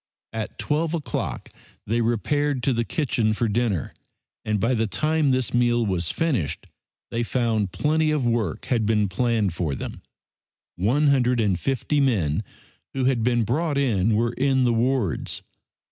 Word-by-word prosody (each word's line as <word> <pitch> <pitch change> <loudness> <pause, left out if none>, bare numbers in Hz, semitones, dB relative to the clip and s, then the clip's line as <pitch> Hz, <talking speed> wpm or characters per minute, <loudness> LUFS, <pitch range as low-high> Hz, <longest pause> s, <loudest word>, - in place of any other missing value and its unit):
At 110 -1 -5
12 160 +2 0
o'clock 155 - -4 0.4
they 115 +3 0
repaired 130 +4 0
to 135 - +2
the 115 0 0
kitchen 115 -5 0
for 115 +2 0
dinner, 110 - -1 0.5
and 105 -1 0
by 115 +5 +1
the 115 -2 +1
time 155 +6 +1
this 130 -2 +1
meal 120 -1 +2
was 90 -5 -1
finished 130 - -1 0.5
they 115 - -1
found 115 -5 0
plenty 155 - +1
of 150 -4 0
work 115 -8 -1
had 115 -4 0
been 105 -2 +2
planned 110 -1 0
for 80 -5 -2
them. - - -6 0.7
One 130 +11 +2
hundred 125 -3 +3
and 100 -5 +1
fifty 135 +2 0
men 105 - +1 0.5
who 130 -1 0
had 130 -3 +2
been 120 0 +2
brought 145 +7 0
in 110 -6 +2
were 115 +2 +1
in 135 0 +2
the 120 -1 +3
wards. 115 - 0
120 Hz, 160 wpm, -24 LUFS, 110-135 Hz, 0.7 s, hundred